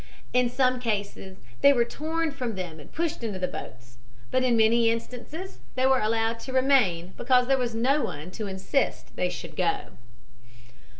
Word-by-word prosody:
"In 250 -1 +3
some 255 0 +2
cases 200 -4 -3 0.2
they 280 - +8
were 240 -3 +3
torn 320 +5 -2
from 250 -5 -4
them 175 -4 -5
and 145 - -14
pushed 330 -4 -2
into 210 -4 -3
the 185 0 -1
boats, 120 -5 -9 0.3
but 255 - +2
in 245 -2 +3
many 225 +1 +5
instances 250 +10 -5 0.2
they 260 0 +2
were 265 -1 +4
allowed 225 +1 0
to 260 - -7
remain 230 -10 +3
because 250 0 +3
there 270 +1 +2
was 240 -2 -1
no 270 +6 +2
one 155 - -5
to 215 +2 -5
insist 190 +8 -1
they - - 0
should - - -7
go. 410 -1 0
240 Hz, 175 wpm, -27 LUFS, 205-265 Hz, 0.3 s, they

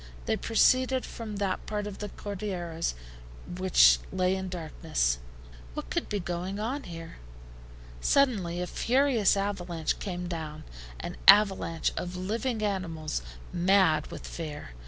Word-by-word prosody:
They - - +1
proceeded 255 +3 +3
from 220 -3 -7
that 200 -2 -1
part 210 -1 -2
of 205 -2 -7
the 210 - -4
Cordilleras 180 - -4 0.6
which 185 -1 +6
lay 185 0 +1
in 190 -1 -4
darkness. 155 - -1 0.6
What - - -6
could - - -1
be 205 - -1
going 175 +3 -3
on 250 +7 -2
there? 165 0 -8 0.8
Suddenly 200 - +2
a - - -1
furious 245 -1 +2
avalanche 180 -5 -2
came 180 -2 -4
down, 155 -3 -5 0.4
an - - -6
avalanche 195 -5 +6
of 180 0 -3
living 220 +4 -2
animals 165 - -2 0.3
mad 175 -4 +4
with - - -8
fear. 150 - -6
185 Hz, 130 wpm, -29 LUFS, 170-210 Hz, 0.8 s, which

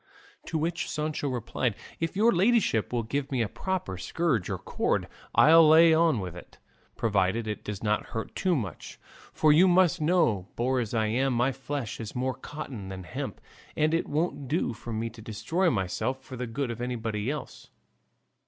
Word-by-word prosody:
To 160 - -1
which 170 +3 -2
Sancho 150 -1 -2
replied, 120 -2 -2 0.2
"If 165 +2 -2
your 220 +4 +4
ladyship 195 - +2
will 120 -2 0
give 140 +5 -3
me 125 -3 +1
a - - -1
proper 175 - -3
scourge 135 - 0
or - - -2
cord, - - -1 0.3
I'll 165 +1 +8
lay 160 +1 +7
on 160 -6 +3
with 90 -3 -5
it, 90 - -12 0.4
provided 105 +1 +1
it 105 -1 -4
does 105 -1 -6
not 105 0 0
hurt 110 - -5
too 185 -2 +1
much; 105 - -5 0.3
for 155 -1 +4
you 175 +5 +6
must 180 -1 +4
know, 150 - +2
boor 130 +2 +1
as 115 -1 -3
I 110 -1 +2
am, 130 +5 +1
my 120 +3 +2
flesh 135 -3 -5
is 110 0 -7
more 130 +1 0
cotton 130 -6 -7
than 95 -1 -7
hemp, 85 - -5 0.4
and 155 +1 +2
it 165 - 0
won't 145 -2 -1
do 145 -3 0
for 120 +1 -8
me 115 +1 -2
to 110 - -13
destroy 160 - 0
myself 110 - -2
for 130 - -9
the 125 0 -4
good 125 +2 -2
of 115 +1 -6
anybody 115 -2 -2
else." 150 0 -6
130 Hz, 185 wpm, -28 LUFS, 110-160 Hz, 0.4 s, I'll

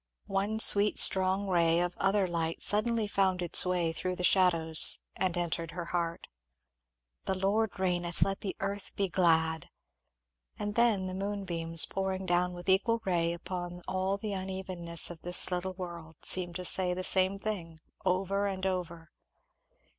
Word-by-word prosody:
One 200 +3 -2
sweet 205 -1 +6
strong 190 +1 +4
ray 170 -2 +2
of 175 0 -2
other 195 0 +1
light 165 -2 -3
suddenly 225 +1 +3
found 195 -2 0
its 175 +1 +5
way 175 -3 0
through 185 +2 -4
the 180 - -6
shadows 170 -4 +3 0.2
and 185 -2 -1
entered 170 -1 -3
her 175 - -4
heart. 170 -1 -3 1.0
"The 190 - -1
Lord 200 +3 -1
reigneth! 175 -2 +1
let 195 0 -3
the 195 - -5
earth 200 0 -5
be 200 - -1
glad!" 160 -3 +1 0.9
and 205 0 -3
then 225 -4 +2
the 185 - -5
moonbeams 185 -5 -1
pouring 190 0 -4
down 180 0 0
with 175 +1 -11
equal 205 +5 +2
ray 170 -3 0
upon 175 0 -6
all 190 +1 -1
the 205 0 -5
unevennesses 185 -3 -2
of 170 - -11
this 180 +1 +1
little 180 +1 -2
world 170 -3 -9
seemed 175 -2 -2
to 180 0 -5
say 180 0 +3
the 185 - -4
same 190 +1 +2
thing 190 -6 -5 0.3
over 195 +2 0
and 190 -1 -4
over. 170 -3 -4
185 Hz, 155 wpm, -30 LUFS, 175-195 Hz, 1.0 s, sweet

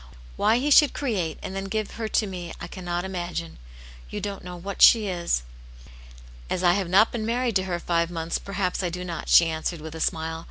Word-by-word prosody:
Why 220 - +3
He 285 +4 0
should 295 0 +7
create 195 - -2
and 190 - -5
then 195 0 -3
give 215 +1 -3
her 225 -1 -4
to 215 - +1
me, 180 -3 -6
I - - -6
cannot 175 -1 -4
imagine. 175 - -5 0.5
You - - -4
don't 200 -1 -5
know 180 0 -7
what 195 +3 -6
she 225 -3 +8
is." 170 - -1 1.1
"As 180 - -1
I 175 -1 +5
have 190 -2 -1
not 200 +5 +5
been 230 -2 -3
married 235 0 0
to 190 - -2
her 175 -2 -2
five 170 -1 0
months, 165 -1 -3
perhaps 195 -2 -2
I 180 - -1
do 180 +1 -5
not," 170 -2 -5
she 170 - +7
answered, 165 +1 -3
with 160 0 -8
a 160 - -7
smile. 160 0 -1
180 Hz, 215 wpm, -25 LUFS, 170-205 Hz, 1.1 s, she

